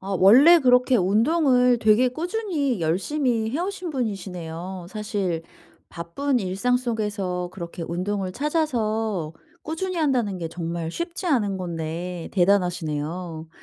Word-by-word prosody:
어 195 0 -3
원래 270 - +8
그렇게 250 0 +4
운동을 250 - +3
되게 220 +3 +4
꾸준히 315 - -2
열심히 220 - 0
해 280 - -2
오신 365 -2 -3
분이시네요. 185 - -5
사실 200 -6 -2 0.5
바쁜 245 +11 -2
일상속에서 200 -3 -1
그렇게 170 -2 -7
운동을 185 +2 -2
찾아서 225 - -1 0.3
꾸준히 360 +4 -3
한다는 250 - +1
게 165 -1 -4
정말 165 -1 -4
쉽지 345 - -4
않은 210 - +1
건데 170 0 -5
대단하시네요. 175 -3 0
205 Hz, 280 characters per minute, -24 LUFS, 180-255 Hz, 0.5 s, 원래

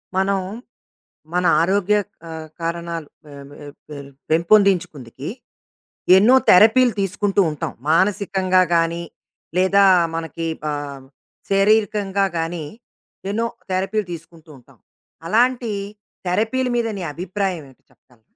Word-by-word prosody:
మనం 195 +1 +1 0.9
మన 180 0 +1 0.2
ఆరోగ్య 200 +3 +2 0.3
ఆహ్, 160 -1 -7
కారణాలు 170 -1 -4 0.2
పే 150 - -14 0.2
పే 145 0 -12 0.2
పే 150 - -8 0.3
పెంపొందించుకుందుకి 170 - +1 0.9
ఎన్నో 225 +7 +6
థెరపీలు 225 +6 +6
తీసుకుంటూ 200 +1 0
ఉంటాం. 150 - -5 0.2
మానసికంగా 185 +1 +2
గాని. 170 +1 0 0.5
లేదా 190 +2 +4 0.3
మనకి 165 0 -4 0.2
ఆహ్, 140 -2 -6 0.5
శరీరకంగా 200 -1 +2
గాని 165 -1 -3 0.7
ఎన్నో 230 +3 -1 0.2
థెరపీలు 195 +2 -1
తీసుకుంటూ 165 -1 -12
ఉంటాం. 125 - -22 0.5
అలాంటి 235 +3 +1 0.6
థెరపీల 225 +8 0
మీద 235 -1 0
నీ 190 - -5
అభిప్రాయం 185 0 -3
ఏమిటి 130 - -23
చెప్పగలరా? 120 -3 -28
185 Hz, 100 wpm, -20 LUFS, 165-205 Hz, 0.9 s, ఎన్నో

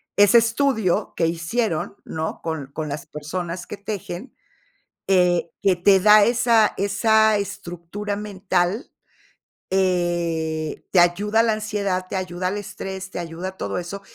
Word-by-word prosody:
ese 205 +3 +6
estudio 230 -4 +1
que 165 - +1
hicieron, 175 +2 -2
¿no? 160 0 -4
Con 160 -4 -4
con 155 -1 -4
las 145 +1 -5
personas 170 +4 -5
que 210 - -7
tejen, 200 +1 -6 0.7
eh, 180 -3 +3
que 195 -2 +3
te 190 +2 +5
da 210 +1 +7
esa 230 -1 +3
esa 220 +2 +3
estructura 195 +1 -5
mental, 195 +1 -1 0.8
eh, 170 -4 -1
te 185 - +5
ayuda 200 +5 +3
a - - +2
la 225 -1 +2
ansiedad, 205 -3 -2
te - - -4
ayuda 180 -1 -3
al 195 +3 -2
estrés, 190 -1 -6
te - - -5
ayuda 170 +2 -5
a 190 - -14
todo - - -3
eso, 180 +3 -6
190 Hz, 145 wpm, -22 LUFS, 175-210 Hz, 0.8 s, da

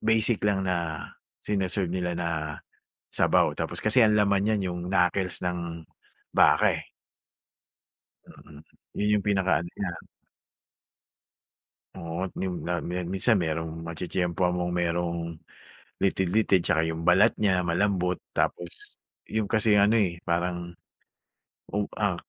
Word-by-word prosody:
...basic 110 0 +2
lang 95 -1 +1
na 85 -4 -2 0.4
sini-serve 95 -2 -1
nila 90 -1 -2
na 85 -1 -1 0.9
sabaw. - - +3
Tapos - - -3
kasi 110 +3 +3
ang 110 - +5
laman 100 -1 +3
'yan 95 -2 -2
yung 90 - -5
knuckles 90 0 +1
ng 85 -2 -4 0.5
baka, - - +5
eh. - - -18 1.4
Mm. 75 -1 -15 0.4
'Yun 105 0 +2
yung - - -9
pinaka-ano 95 -4 +1
niya. 90 -4 -2 2.0
Oo, 85 +3 -4
yun-a 90 -2 -3
minsan 90 +5 0
merong 80 -1 -2 0.2
matitiyempohan 90 +1 -1
mong 90 0 -2
merong, 85 0 0 0.8
litid-litid, 95 0 +2
'tsaka 80 -2 +1
yung 80 0 -5
balat 90 +3 +5
niya 95 -4 +2
malambot, 90 0 +1
tapos 85 -1 -3 0.3
yung 110 -2 -2
kasi 110 -1 +3
ano 105 +3 +5
eh, 90 -4 -1
parang, 85 0 -2 1.0
oh 105 - +1 0.2
ah, 100 -4 +1
90 Hz, 115 wpm, -27 LUFS, 85-100 Hz, 2.0 s, ang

